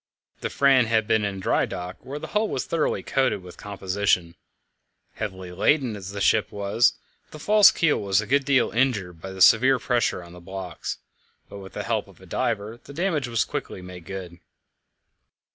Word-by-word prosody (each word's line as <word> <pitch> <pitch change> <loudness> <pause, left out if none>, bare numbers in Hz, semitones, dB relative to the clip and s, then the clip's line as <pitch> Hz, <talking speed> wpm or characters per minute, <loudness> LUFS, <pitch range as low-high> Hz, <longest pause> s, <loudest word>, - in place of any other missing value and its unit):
The - - -3
Fram 135 -3 +4
had 110 -1 +2
been 110 0 +2
in 100 -1 -3
dry 95 - +1
dock, 90 0 -6
where 140 +2 -6
the - - -7
hull 210 +1 +1
was 130 - -3
thoroughly 165 -2 -1
coated 130 -8 0
with 90 -1 -11
composition. 95 -3 -1 0.8
Heavily 95 -4 -6
laden 120 - +1
as 95 -2 -7
the 100 0 -6
ship 105 +2 +2
was, 100 +4 +2 0.4
the - - -10
false 210 +6 +6
keel 165 -3 +1
was 100 -1 +2
a 105 - -2
good 140 +6 +2
deal 135 -1 +2
injured 105 -9 0
by 95 - -7
the 95 -1 +2
severe 130 +4 +6
pressure 120 -6 0
on 85 0 -13
the 90 - -11
blocks, 95 -2 -6 0.5
but 100 - -9
with 95 -1 -11
the - - -4
help - - -1
of - - -18
a - - -15
diver 110 0 -2
the 140 - -12
damage 165 -6 0
was 115 -2 0
quickly 90 - -5
made 90 -2 -10
good. 90 -2 -7
105 Hz, 190 wpm, -25 LUFS, 95-130 Hz, 0.8 s, false